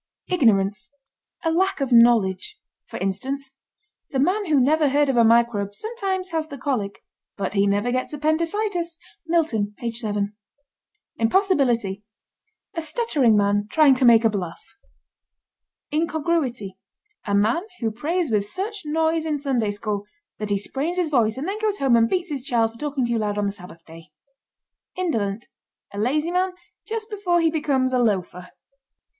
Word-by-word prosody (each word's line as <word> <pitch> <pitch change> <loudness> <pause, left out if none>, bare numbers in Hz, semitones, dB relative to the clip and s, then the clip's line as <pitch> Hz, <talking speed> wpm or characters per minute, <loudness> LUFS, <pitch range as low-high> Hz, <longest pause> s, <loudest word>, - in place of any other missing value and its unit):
IGNORANCE. 200 - +2 0.5
A 325 - +1
lack 380 +3 +1
of 270 -2 -2
knowledge. 235 - +4 0.3
For - - -7
instance: 265 +8 -3 0.6
The 275 - -3
man 370 +9 +1
who 300 -3 +3
never 300 +3 +3
heard 290 +1 +2
of 270 - +1
a 235 - +5
microbe 225 -3 +2
sometimes 390 - -3
has 320 -1 -1
the 280 - -8
colic, 250 -8 -3 0.3
but 200 - -3
he 200 0 +2
never 205 +4 +1
gets 255 +1 -2
appendicitis. 335 +4 -1 0.3
(Milton, 235 -12 0
page 235 -1 -3
7.) 205 -2 -2 0.8
IMPOSSIBILITY. 235 - +1 0.7
A 330 - -3
stuttering 305 - +2
man 205 0 +1
trying 300 0 +5
to 260 0 -1
make 230 -2 +6
a - - +6
bluff. 180 -5 -6 1.2
INCONGRUITY. 295 - -1 0.5
A 200 - +1
man 220 +10 +2 0.2
who 225 -2 -1
prays 310 +6 -2
with 205 -2 +1
such 400 - -4
noise 320 +1 +1
in 310 -2 -1
Sunday 260 -7 0
School 205 0 -4 0.3
that 210 -1 -4
he 200 - +2
sprains 280 - -3
his 345 -4 0
voice 230 -4 +2
and 285 +6 -4
then 405 +2 -3
goes 430 -2 0
home 270 -3 +3
and 230 0 +4
beats 360 -3 -1
his 275 -4 -3
child 235 -4 +1
for 230 - -16
talking 285 -4 -1
too 235 -1 0
loud 210 -1 -2
on 205 - 0
the 200 - 0
Sabbath 180 -4 -13
day. 165 -1 -14 0.9
INDOLENT. 225 - -1 0.5
A 200 - -5
lazy 300 +9 0
man 365 +1 0 0.3
just 445 -1 -4
before 375 -4 +1
he 330 -1 +2
becomes 275 -5 0
a 250 - +3
loafer. 185 -5 -1
260 Hz, 160 wpm, -23 LUFS, 210-325 Hz, 1.2 s, make